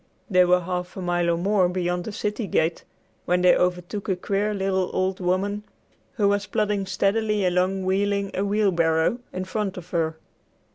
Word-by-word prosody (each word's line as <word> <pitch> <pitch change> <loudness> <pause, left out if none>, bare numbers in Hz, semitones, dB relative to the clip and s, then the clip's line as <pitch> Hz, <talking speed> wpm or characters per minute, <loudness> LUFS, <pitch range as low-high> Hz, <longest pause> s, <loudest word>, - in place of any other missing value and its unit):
They 180 -1 +6
were 180 0 +4
half 180 +1 -4
a - - -4
mile 175 -1 +1
or 170 - +2
more 190 0 +2
beyond 180 -1 -2
the - - -4
city 210 +1 -3
gate 165 -1 0 0.4
when 180 0 +1
they 180 - +6
overtook 180 +3 -1
a 190 - +2
queer 200 +3 -1
little 190 -2 0
old 185 +1 0
woman 190 +3 0 0.5
who 205 -3 +2
was 205 0 +1
plodding 205 -1 0
steadily 205 +2 +1
along 185 +1 +1
wheeling 200 +1 0
a 190 - -1
wheelbarrow, 190 -2 +2
in 185 0 -4
front 195 -1 -3
of 180 0 -10
her. 160 -2 0
185 Hz, 175 wpm, -24 LUFS, 180-205 Hz, 0.5 s, They